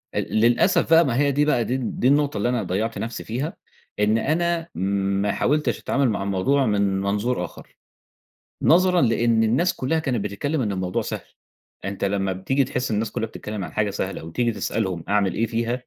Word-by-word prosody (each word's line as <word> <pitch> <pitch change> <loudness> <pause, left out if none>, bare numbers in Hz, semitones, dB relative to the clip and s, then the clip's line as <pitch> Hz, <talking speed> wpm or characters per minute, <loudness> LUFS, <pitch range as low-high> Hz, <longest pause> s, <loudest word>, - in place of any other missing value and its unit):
ال - - -2
للأسف 120 - +3
بقى، 165 +1 +7
ما 125 -4 0
هي 140 +1 +3
دي 145 +2 +2
بقى 130 -6 +2
دي 130 - -1
دي 125 0 -1
النُّقطة 145 -3 +2
اللي 105 +4 0
أنا 120 -3 0
ضيَّعت 105 +5 -2
نفسي 115 +1 -4
فيها، 130 +8 -3 0.5
إن 105 +1 +3
أنا 165 +6 0
ما 100 +1 0
حاولتش 150 +3 0
أتعامل 140 -3 +1
مع 100 -2 -1
الموضوع 100 +9 +1
من 100 -3 +1
منظُور 105 +5 -1
آخر. - - -14 0.9
نظرًا 180 0 +4
لأن 115 -2 +3
الناس 130 +12 +2
كلها 160 +5 -1
كانت 125 -9 -1
بتتكلَّم 140 +10 -2
إن 105 -5 -1
الموضوع 95 -1 -2
سهل، - - -6 0.6
أنتَ 95 +1 -3
لمّا 100 -1 0
بتيجي 135 +10 0
تحِس 125 0 -3
الناس 110 0 -1
كلها 110 - -2
بتتكلَّم 105 -2 -6
عن - - -8
حاجة 105 -1 0
سهلة 95 -3 -4
وتيجي 115 +9 -1
تسألهم 95 -5 -2
أعمل 100 -2 +2
إيه 115 - +1
فيها، 115 +1 -1
115 Hz, 185 wpm, -23 LUFS, 100-135 Hz, 0.9 s, بقى